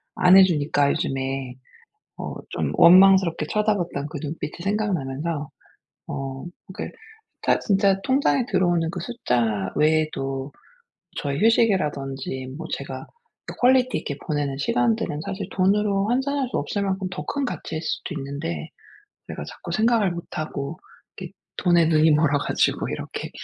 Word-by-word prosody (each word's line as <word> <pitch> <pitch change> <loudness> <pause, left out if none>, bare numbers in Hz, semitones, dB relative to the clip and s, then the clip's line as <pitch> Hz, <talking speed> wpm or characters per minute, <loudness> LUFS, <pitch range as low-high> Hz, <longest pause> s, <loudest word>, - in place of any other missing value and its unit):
안 180 +1 +6
해주니까 150 -6 +4
요즘에 135 -1 -2 0.6
어 - - -5 0.2
좀 - - -2
원망스럽게 185 -2 +6
쳐다봤던 205 -7 -1
그 155 - -5
눈빛이 150 0 -4
생각나면서 165 -7 -2 0.6
어 135 +1 -5 0.3
그러니까 - - -7 0.4
타 - - +2
진짜 195 -1 +2
통장에 265 -1 +2
들어오는 175 -4 +2
그 175 - -5
숫자 120 - -1
외에도 145 -3 0 0.7
저의 140 +1 -2
휴식이라든지 145 - +1
뭐 165 0 -6
제가 135 -1 -6 0.5
퀄리티 255 0 +4
있게 145 - -5
보내는 145 -3 -1
시간들은 120 +2 0
사실 195 -1 -4
돈으로 200 +1 +2
환산할 265 +1 0
수 - - -2
없을 205 - -2
만큼 190 -1 -1
더 150 -5 -5
큰 280 - -2
가치일 160 -9 -4
수도 175 - -4
있는데 145 +4 -5 0.6
내가 - - -6
자꾸 - - -9
생각을 220 -3 +3
못 170 0 -5
하고 155 +1 -4 0.4
이렇게 - - -8 0.2
돈에 175 -3 +3
눈이 155 -1 +4
멀어 150 -1 +3
가지고 - - 0
이렇게 - - -5
165 Hz, 305 characters per minute, -24 LUFS, 140-195 Hz, 0.7 s, 안